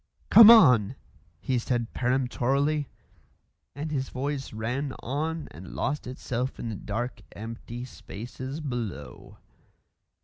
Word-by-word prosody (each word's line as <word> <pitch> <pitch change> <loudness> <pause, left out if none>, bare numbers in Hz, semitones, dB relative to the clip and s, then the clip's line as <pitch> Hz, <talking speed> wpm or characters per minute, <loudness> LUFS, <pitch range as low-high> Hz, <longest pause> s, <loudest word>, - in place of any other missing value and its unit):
"Come 225 -1 +11
on!" 130 - +7 0.4
he 130 +6 0
said 120 -1 -2
peremptorily, 135 +3 0 0.9
and 150 +2 -4
his 135 -3 -2
voice 140 +1 -3
ran 125 +6 -3
on 155 +5 -2
and 90 +2 -10
lost 150 -2 -2
itself 125 0 -3
in 115 - -4
the 110 - -4
dark, 120 +6 -4
empty 115 +3 -7
spaces 130 +5 -8
below. 110 - -6
125 Hz, 110 wpm, -27 LUFS, 115-140 Hz, 0.9 s, Come